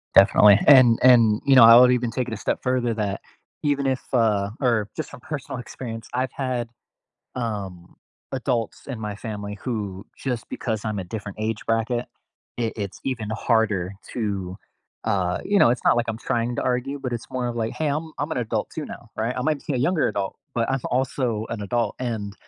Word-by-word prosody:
Definitely. 100 Hz, +1 st, +7 dB
And 130 Hz, -5 st, +8 dB
and, 115 Hz, -4 st, +6 dB
you 135 Hz, -1 st, +5 dB
know, 120 Hz, -, +9 dB
I 115 Hz, +1 st, +10 dB
would 125 Hz, 0 st, +7 dB
even 120 Hz, -2 st, 0 dB
take 125 Hz, 0 st, -2 dB
it 115 Hz, -, -4 dB
a -, -, -4 dB
step -, -, -1 dB
further 125 Hz, -2 st, 0 dB
that 100 Hz, -3 st, -2 dB, 0.4 s
even 140 Hz, -2 st, +1 dB
if, 130 Hz, -1 st, 0 dB
uh 105 Hz, -4 st, +2 dB
or 115 Hz, -5 st, +1 dB
just 155 Hz, -, -4 dB
from 135 Hz, -4 st, -12 dB
personal 140 Hz, -4 st, -5 dB
experience, 115 Hz, -2 st, -7 dB
I've 130 Hz, +1 st, -1 dB
had, 125 Hz, -3 st, -3 dB, 0.7 s
um, 100 Hz, -7 st, -5 dB, 0.4 s
adults 125 Hz, -3 st, -2 dB
in 125 Hz, -5 st, -5 dB
my 105 Hz, -2 st, -4 dB
family 105 Hz, -2 st, -6 dB
who 105 Hz, -6 st, -4 dB
just 125 Hz, -4 st, -4 dB
because 110 Hz, -2 st, -3 dB
I'm 105 Hz, -1 st, -2 dB
a -, -, -3 dB
different 105 Hz, +2 st, -7 dB
age 110 Hz, 0 st, -3 dB
bracket, 115 Hz, +2 st, 0 dB, 0.5 s
it 115 Hz, -2 st, -1 dB
it's 100 Hz, -3 st, -5 dB
even 115 Hz, -5 st, -2 dB
harder 110 Hz, -5 st, +1 dB, 0.2 s
to, 95 Hz, -5 st, -3 dB, 0.5 s
uh, 90 Hz, -2 st, 0 dB
you 205 Hz, 0 st, +3 dB
know, -, -, +6 dB
it's 120 Hz, -, -1 dB
not -, -, +5 dB
like 120 Hz, -, 0 dB
I'm 110 Hz, -, -3 dB
trying 120 Hz, +1 st, -1 dB
to -, -, -2 dB
argue, 130 Hz, +3 st, -1 dB
but 125 Hz, -2 st, -4 dB
it's 115 Hz, -, -5 dB
more 125 Hz, -1 st, -2 dB
of 120 Hz, -, -4 dB
like, 115 Hz, -1 st, -2 dB
"Hey. 155 Hz, -, -1 dB
I'm 155 Hz, +3 st, -2 dB
I'm 145 Hz, +2 st, -2 dB
an -, -, -1 dB
adult 110 Hz, -2 st, -2 dB
too 155 Hz, -, -4 dB
now," 115 Hz, -, -10 dB
right? 115 Hz, +3 st, -1 dB
I -, -, -1 dB
might 150 Hz, +1 st, 0 dB
be 145 Hz, -, 0 dB
a -, -, 0 dB
younger 155 Hz, +5 st, +2 dB
adult, 100 Hz, -2 st, -3 dB, 0.2 s
but 115 Hz, +1 st, 0 dB
I'm 135 Hz, -, 0 dB
also 125 Hz, -3 st, 0 dB
an 115 Hz, -3 st, -4 dB
adult, 115 Hz, +4 st, -1 dB
and 110 Hz, -5 st, -3 dB
115 Hz, 205 wpm, -24 LUFS, 105-125 Hz, 0.7 s, I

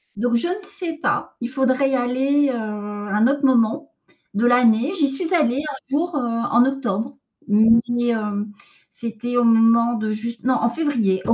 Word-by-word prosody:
Donc, 235 Hz, +3 st, 0 dB
je 235 Hz, -, 0 dB
ne 370 Hz, +3 st, -3 dB
sais 375 Hz, -4 st, -6 dB
pas, 315 Hz, -, -3 dB
il 240 Hz, -, -2 dB
faudrait 265 Hz, +1 st, +1 dB
y -, -, +2 dB
aller, 265 Hz, +3 st, +1 dB
heu, -, -, -1 dB
à 230 Hz, -, -4 dB, 0.5 s
un 215 Hz, +3 st, +4 dB
autre 280 Hz, +1 st, 0 dB
moment, 260 Hz, +4 st, +1 dB, 0.4 s
de 210 Hz, +4 st, 0 dB
l'année. 245 Hz, +2 st, +3 dB
J'y 295 Hz, -4 st, +3 dB
suis 325 Hz, +6 st, -2 dB
allée 280 Hz, -8 st, +2 dB
un 300 Hz, -2 st, -6 dB
jour, 315 Hz, +5 st, -1 dB
heu, -, -, 0 dB
en 240 Hz, 0 st, +1 dB
octobre, 260 Hz, -2 st, -3 dB, 0.3 s
mais, 230 Hz, +3 st, +3 dB
hem, 210 Hz, -2 st, -2 dB, 0.4 s
c'était 235 Hz, +2 st, -5 dB
au 240 Hz, -, +3 dB
moment 230 Hz, +1 st, +4 dB
de 220 Hz, -1 st, -2 dB
juste 230 Hz, +2 st, -5 dB
non, 255 Hz, +1 st, +2 dB
en 235 Hz, -, +1 dB
février, 235 Hz, -9 st, 0 dB
au 230 Hz, -, +4 dB
240 Hz, 185 wpm, -21 LUFS, 230-275 Hz, 0.5 s, un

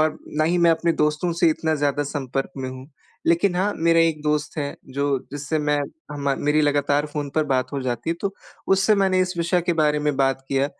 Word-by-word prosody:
और 155 Hz, 0 st, +1 dB, 0.2 s
ना 155 Hz, -, +3 dB
ही 175 Hz, +3 st, +2 dB
मैं 170 Hz, -1 st, +5 dB
अपने 165 Hz, +1 st, +2 dB
दोस्तों 150 Hz, +3 st, 0 dB
से 170 Hz, -, +6 dB
इतना 160 Hz, 0 st, 0 dB
ज़्यादा 145 Hz, 0 st, 0 dB
संपर्क 135 Hz, -2 st, -3 dB
में 130 Hz, -1 st, -4 dB
हूँ। 130 Hz, +1 st, -9 dB, 0.4 s
लेकिन 175 Hz, +3 st, +3 dB
हाँ, 200 Hz, +3 st, +1 dB
मेरा 165 Hz, 0 st, +3 dB
एक 165 Hz, -2 st, +2 dB
दोस्त 150 Hz, +1 st, -1 dB
है 145 Hz, -1 st, -2 dB, 0.2 s
जो 140 Hz, -1 st, +1 dB
जिससे 145 Hz, +2 st, -2 dB
मैं 150 Hz, -1 st, +1 dB, 0.3 s
हम 140 Hz, -1 st, -1 dB
मेरी 150 Hz, +1 st, +3 dB
लगातार 145 Hz, 0 st, +2 dB
फ़ोन 145 Hz, -2 st, -4 dB
पर 155 Hz, -, +2 dB
बात 130 Hz, -2 st, -1 dB
हो 140 Hz, -, -2 dB
जाती 120 Hz, +3 st, -2 dB
है 165 Hz, -, -1 dB
तो 200 Hz, -1 st, -2 dB, 0.3 s
उससे 195 Hz, +2 st, +4 dB
मैंने 190 Hz, -2 st, +2 dB
इस 185 Hz, -1 st, -1 dB
विषय 170 Hz, +2 st, +2 dB
के 175 Hz, -, +3 dB
बारे 150 Hz, 0 st, +2 dB
में 150 Hz, -2 st, 0 dB
बात 135 Hz, -1 st, +1 dB
की -, -, -3 dB
है 135 Hz, -, +3 dB
150 Hz, 230 wpm, -23 LUFS, 140-165 Hz, 0.4 s, से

